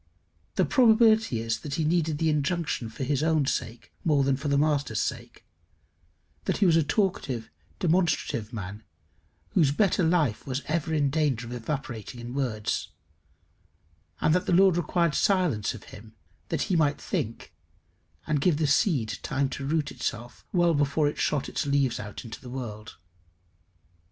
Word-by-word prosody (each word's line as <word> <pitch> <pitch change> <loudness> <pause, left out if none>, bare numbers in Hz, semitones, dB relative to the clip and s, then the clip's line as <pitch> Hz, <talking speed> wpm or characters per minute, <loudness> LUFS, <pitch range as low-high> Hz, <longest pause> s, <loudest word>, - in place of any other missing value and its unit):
The - - +3
probability 225 - +4
is 115 -1 -1
that 145 -3 -5
he 160 - 0
needed 160 -1 +1
the 160 +1 +2
injunction 150 -4 -1
for 110 - -6
his 140 +1 0
own 155 -2 +2
sake 115 -3 -4
more 150 -4 +3
than 135 0 +2
for 140 +3 -5
the 140 0 +2
master's 145 -7 +1
sake; - - -4 1.0
that - - 0
he 205 - +3
was 170 -3 +5
a 165 - +5
talkative, 145 - -1 0.3
demonstrative 160 - 0
man, 105 -2 -6 0.7
whose 145 - +3
better 190 +4 +2
life 160 -10 +1
was 135 +1 -2
ever 160 +1 -1
in 145 -3 +1
danger 140 -6 0
of 120 - -7
evaporating 120 -2 -5
in 120 +1 -7
words; 120 -6 -2 1.3
and 155 - +3
that 180 - +1
the - - +2
Lord 190 0 +6
required 170 -1 +1
silence 175 - +1
of 110 - -11
him, 110 +1 -13 0.3
that 160 -3 0
he 185 - 0
might 150 -3 +2
think, 115 +1 -4 0.7
and 150 -2 0
give 165 -1 +3
the 160 - +1
seed 140 - +1
time 135 0 -1
to 135 0 -5
root 150 -1 0
itself 120 -1 -5
well 175 -2 +3
before 145 +1 +2
it 145 - -3
shot 145 -3 0
its - - -3
leaves 140 -3 +1
out 105 +3 -7
into 115 - -8
the 125 - -10
world. 110 -6 -7
145 Hz, 165 wpm, -27 LUFS, 120-165 Hz, 1.3 s, Lord